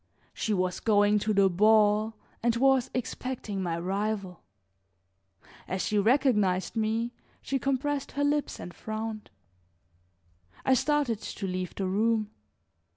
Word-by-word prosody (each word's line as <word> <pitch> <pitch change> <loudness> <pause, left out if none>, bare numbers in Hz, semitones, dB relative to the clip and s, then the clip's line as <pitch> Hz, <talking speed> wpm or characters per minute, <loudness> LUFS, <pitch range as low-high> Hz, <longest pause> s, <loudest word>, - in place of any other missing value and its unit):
She 220 - -2
was 185 -3 0
going 210 -1 +3
to 215 +1 -1
the 200 -2 +4
ball 210 +3 +3 0.3
and 235 0 +2
was 265 0 +3
expecting 245 -4 -4
my 170 -2 -2
rival. 195 0 -3 1.3
As 185 0 -2
she 210 -1 +1
recognized 210 -6 +2
me, 225 +2 0 0.3
she 270 - -1
compressed 275 +1 -1
her 285 - 0
lips 290 0 0
and 175 - -8
frowned. 220 0 -5 1.4
I 265 - +4
started 260 -4 +1
to 200 - -5
leave 185 -1 -3
the 195 - -2
room. 215 +2 +1
215 Hz, 125 wpm, -28 LUFS, 195-245 Hz, 1.4 s, the